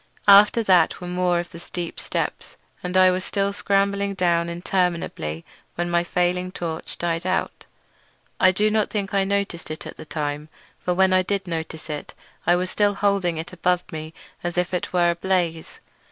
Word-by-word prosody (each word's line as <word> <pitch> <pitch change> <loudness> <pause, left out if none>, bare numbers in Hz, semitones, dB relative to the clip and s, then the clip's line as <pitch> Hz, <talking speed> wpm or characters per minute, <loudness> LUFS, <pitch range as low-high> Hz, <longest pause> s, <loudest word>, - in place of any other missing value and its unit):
After 205 +3 +7
that 185 -4 +4
were 180 - -7
more 180 0 +1
of 175 - -5
the 170 - -9
steep 175 0 -6
steps, - - -3 0.3
and 180 +1 -1
I 185 0 +7
was 185 0 -2
still 200 +1 0
scrambling 200 0 +1
down 170 -2 +1
interminably 170 - -2 0.3
when 175 0 -2
my 170 0 +3
failing 180 +1 0
torch 165 -3 -5
died 170 -1 -1
out. 185 +1 -2 0.7
I 185 - +6
do 210 +3 +2
not 215 -1 +1
think 200 -2 -3
I 195 -1 +3
noticed 200 -3 -2
it 155 - -6
at - - -8
the - - -9
time, 150 0 -4 0.3
for 180 - -1
when 190 0 +4
I 185 - +5
did 195 +1 -2
notice 160 -2 -5
it 150 -2 -6 0.3
I 175 - +6
was 180 +1 -2
still 205 -1 +2
holding 195 -5 +1
it 160 +2 -5
high - - -17
above 180 0 +1
me 155 0 -6 0.3
as 175 0 -3
if 180 +1 0
it 180 - -2
were 175 -1 +3
ablaze. 170 -2 -1
180 Hz, 185 wpm, -23 LUFS, 170-195 Hz, 0.7 s, After